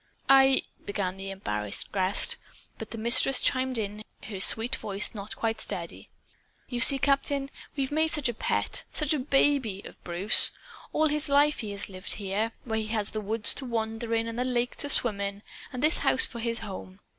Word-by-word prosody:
"I 270 0 +5
" - - -33
began 195 -2 -3
the 195 0 -7
embarrassed 105 - -4
guest; 190 0 +1 0.4
but - - -8
the 230 - -8
Mistress 240 +4 +4
chimed 260 -1 +1
in, 210 0 -5 0.2
her 205 -4 -7
sweet 225 +4 +1
voice 200 0 +3
not 210 +1 -5
quite 225 -1 -3
steady. - - -4 0.6
"You 245 - -5
see, 275 +3 +7
Captain, 275 0 0 0.2
we've 275 -1 -3
made 315 +2 +1
such 300 -4 +1
a 240 - -2
pet - - -2
such 305 -1 -1
a 300 - -1
baby 265 -6 +1
of - - -13
Bruce! 180 +5 +3 0.4
All 310 0 +1
his 300 0 0
life 290 +1 +3
he 220 -3 -5
has 200 - -4
lived 185 -1 -6
here 195 -2 -6
here 220 +2 -1
where 220 -2 -3
he 215 - -4
had 215 -1 -2
the 215 - -4
woods 210 +1 +5
to 270 - -2
wander 225 -1 -3
in 225 0 -1
and 230 +1 -5
the - - +1
lake 245 -1 -2
to 285 - +1
swim 220 -7 +4
in, 200 +1 -5 0.3
and 255 0 -6
this 310 +2 +4
house 260 - +4
for 235 - -9
his 230 0 0
home. 190 -2 -9
230 Hz, 200 wpm, -27 LUFS, 205-270 Hz, 0.6 s, see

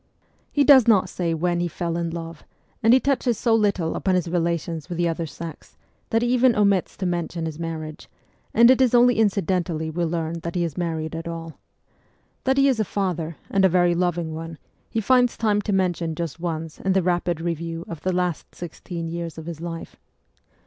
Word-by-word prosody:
He 290 - +3
does 265 -4 +7
not 195 -5 +4
say 170 -2 -1
when 175 +2 0
he 175 - 0
fell 170 0 -3
in 170 0 -1
love, 165 -1 -7 0.4
and 225 - +5
he 255 - +7
touches 260 -4 +1
so 230 0 +2
little 200 -7 +1
upon 190 -1 +1
his 180 -2 0
relations 170 -1 -2
with 175 - -4
the 175 0 +2
other 165 0 -2
sex, 160 0 -9 0.3
that 225 +1 +2
he - - +1
even 250 -1 +4
omits 200 -3 +2
to 190 - -3
mention 175 -1 -2
his 160 -1 -5
marriage, 160 -2 -6 0.4
and 235 +2 +7
it 260 - +3
is 250 -2 +4
only 245 -1 +5
incidentally 180 -6 0
we 170 +2 -2
learn 165 0 -2
that 170 +1 -6
he 175 - +1
is 165 -4 -3
married 160 -2 -3
at 165 +1 -5
all. 165 -1 -7 0.9
That 265 +1 +2
he 275 0 +5
is 260 -5 +2
a - - +3
father, 175 -6 -2
and 195 -1 +3
a 190 - +6
very 175 0 +3
loving 170 -2 -1
one, 165 0 -7 0.3
he 225 - -1
finds 250 +2 +3
time 210 -2 +2
to 205 - -3
mention 175 -4 0
just 165 -1 -4
once 165 -2 -4
in 190 - 0
the 190 -1 +2
rapid 175 -1 0
review 165 0 -4
of 165 -3 -7
the 185 - 0
last 180 -3 -2
sixteen 170 0 -6
years 170 -1 -5
of 160 - -8
his 165 -2 -7
life. 170 -1 -7
175 Hz, 205 wpm, -23 LUFS, 165-200 Hz, 0.9 s, does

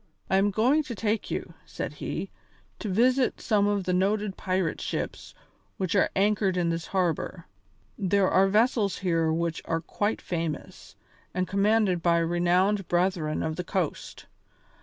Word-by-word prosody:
"I 190 - +4
am 200 +1 +3
going 245 +9 +3
to 240 - -5
take 215 +1 -1
you," - - -4
said - - -5
he, - - -5 0.5
"to 215 - -4
visit 250 +6 +2
some 205 -3 +2
of 205 -1 0
the 180 - -1
noted 200 +2 +1
pirate 185 -2 -1
ships - - -4 0.4
which 185 -3 -1
are 195 - +3
anchored 200 -1 +2
in 175 -1 +1
this 165 0 -3
harbour. 180 -1 -1 0.5
There 195 0 +2
are 190 +1 +4
vessels 215 0 +2
here 165 -3 +1
which 165 0 -1
are 165 - 0
quite 205 +5 -2
famous, 165 -4 -5 0.4
and 185 0 0
commanded 200 -2 +2
by 170 0 +3
renowned 175 +4 +2
Brethren 175 -3 0
of 155 0 -3
the 180 - -2
Coast. 180 -3 -3
190 Hz, 155 wpm, -27 LUFS, 175-205 Hz, 0.5 s, I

